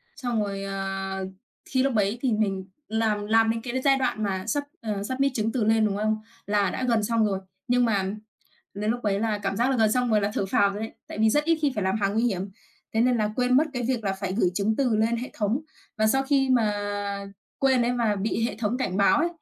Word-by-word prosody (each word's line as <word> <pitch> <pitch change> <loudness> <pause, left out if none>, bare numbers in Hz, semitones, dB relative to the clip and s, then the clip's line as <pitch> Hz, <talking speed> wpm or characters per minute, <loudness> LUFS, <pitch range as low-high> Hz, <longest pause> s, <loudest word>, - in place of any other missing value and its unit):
Xong 240 -6 -1
rồi, 195 -1 -4
ờ, 195 -1 -3 0.4
thi 260 -1 +1
lúc 270 -2 +1
đấy 210 +1 +1
thì 255 -5 +1
mình 195 -3 0 0.2
làm 215 -2 0
làm 225 0 +4
đến 225 0 -3
cái 245 0 -5
cái 260 - -1
giai 275 -1 +4
đoạn 250 -5 -1
mà 190 -1 -2
sub, 285 +6 0 0.2
ờ, 210 -3 -3
submit 265 +4 0
chứng 220 0 0
từ 235 -1 0
lên, 220 0 +3
đúng 200 -1 0
không? 215 +1 +1 0.3
Là 205 -1 +2
đã 260 - -4
gần 225 -3 +2
xong 230 0 +2
rồi. 195 -2 0 0.3
Nhưng 245 0 +3
mà 200 -4 +1 0.7
đến 210 +2 -1
lúc 245 +1 -2
ấy 200 -1 0
là 220 -2 0
cảm 195 -1 -2
giác 245 +4 +2
là 265 - +1
gần 220 -2 +3
xong 250 -1 +1
rồi 215 -1 +4
là 200 +1 0
thở 195 - 0
phào 200 -1 +4
rồi 205 +2 -5
đấy. 225 - -5
Tại - - -8
vì 220 0 +4
rất 295 +4 +2
ít 330 0 +2
khi 285 - +2
phải 205 -3 -1
làm 190 +3 +1
hàng 195 0 +1
nguy 225 +2 +2
hiểm, 195 -4 -1 0.4
thế 220 - +2
nên 250 +1 +3
là 215 -2 0
quên 250 0 +3
mất 305 - +5
cái 250 -3 -2
việc 245 -4 -1
là 195 - +1
phải 190 -1 -4
gửi 190 -3 +2
chứng 210 +3 +1
từ 250 -6 +2
lên 225 +2 +2
hệ 245 +3 -5
thống. 220 +5 0 0.4
Và 215 - +3
sau 270 +5 +3
khi 270 -1 +2
mà 225 -5 +3 0.9
quên 265 -2 +3
ấy 240 +1 +1
mà 230 -4 +1
bị 215 +3 -1
hệ - - -5
thống 230 +2 -1
cảnh 190 -8 -1
báo 200 +8 +4
ấy, 335 - +2
220 Hz, 260 wpm, -26 LUFS, 205-245 Hz, 0.9 s, mất